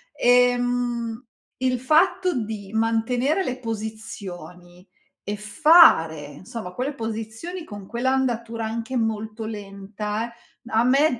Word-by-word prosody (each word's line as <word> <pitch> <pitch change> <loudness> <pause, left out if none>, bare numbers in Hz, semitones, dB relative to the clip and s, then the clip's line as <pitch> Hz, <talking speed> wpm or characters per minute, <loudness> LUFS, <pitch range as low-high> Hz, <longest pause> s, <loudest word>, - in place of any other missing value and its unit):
Ehm, 245 -1 +2 0.3
il 255 -1 0
fatto 355 +6 +3
di 210 -2 -6
mantenere 230 - +1
le 255 -7 -3
posizioni 205 -6 -7 0.4
e 205 - -3
fare, 210 - +5
insomma, 190 -1 -7
quelle 260 +8 -2
posizioni 225 +9 -5
con 205 -7 -9
quell'andatura, 235 -2 -1
anche 230 +3 -4
molto 220 -1 -2
lenta, 210 +2 -5 0.4
a 225 -2 +2
me 265 +1 +3
225 Hz, 100 wpm, -24 LUFS, 215-255 Hz, 0.4 s, fare